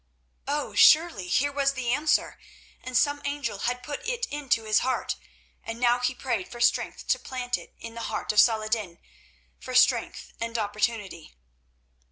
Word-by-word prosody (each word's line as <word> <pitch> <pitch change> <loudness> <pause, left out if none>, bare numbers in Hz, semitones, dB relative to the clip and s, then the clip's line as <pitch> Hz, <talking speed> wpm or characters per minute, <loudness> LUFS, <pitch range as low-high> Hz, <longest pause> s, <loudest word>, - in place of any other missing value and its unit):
Oh! 285 -6 -2
surely 255 - +5
here 285 +10 +1
was 275 -1 +1
the 250 -2 -1
answer, 300 +3 +1 0.4
and 255 -1 -1
some 290 +2 +2
angel 285 -7 -3
had 250 +3 -2
put 290 -1 -6
it 480 -1 -1
into 280 -6 0
his 215 -1 +3
heart, 260 0 -1 0.5
and 225 +1 -6
now 245 0 +3
he 250 +1 -1
prayed 235 -7 -2
for 240 - -10
strength 235 - +1
to - - +3
plant 250 -1 -3
it - - -11
in 230 0 -8
the 230 - -7
heart - - -2
of 210 - +3
Saladin, 215 -5 +2 0.6
for 255 - -7
strength 250 -2 +2
and 230 0 -2
opportunity. 205 - -3
245 Hz, 165 wpm, -26 LUFS, 220-275 Hz, 0.6 s, surely